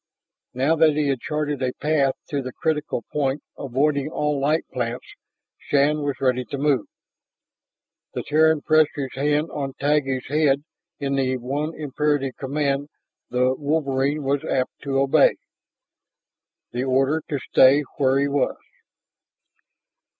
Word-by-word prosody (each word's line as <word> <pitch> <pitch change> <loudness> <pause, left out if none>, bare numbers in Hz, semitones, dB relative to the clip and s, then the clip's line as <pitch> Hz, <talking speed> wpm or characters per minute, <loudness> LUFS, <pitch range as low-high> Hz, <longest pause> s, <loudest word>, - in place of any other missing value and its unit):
Now 135 +6 +2
that 155 -1 +5
he 150 -1 +1
had 135 -2 0
charted 150 0 -2
a 125 -1 0
path 145 -3 +1
to 145 -2 -1
the 130 -1 -6
crucial 150 -4 -2
point 140 -1 0
avoiding 140 +2 0
all 150 -2 -1
light 150 +4 +1
plants, 120 -1 -3 0.5
Shann 145 +2 +2
was 145 -2 -2
ready 125 -1 +1
to 140 - -5
move. 140 -5 +1 1.3
The - - -2
Terran 160 0 +3
pressed 155 -1 +3
his 135 -3 -4
hand 150 +3 0
on 135 -2 -4
Taggi's 140 -3 +1
head 145 -1 +2 0.4
in 140 -1 -2
the 130 -1 +1
one 145 +6 -3
imperative 145 -2 -1
command 140 +1 -1 0.4
the 125 +1 +2
wolverine 145 0 0
was 140 +1 0
apt 130 -1 0
to 135 -1 -2
obey 135 0 +4 1.4
the 125 +1 -2
order 135 +4 +2
to 145 - -1
stay 135 +2 +5
where 135 -1 +3
he 140 +1 +2
was. 140 -1 0
140 Hz, 135 wpm, -23 LUFS, 135-150 Hz, 1.4 s, that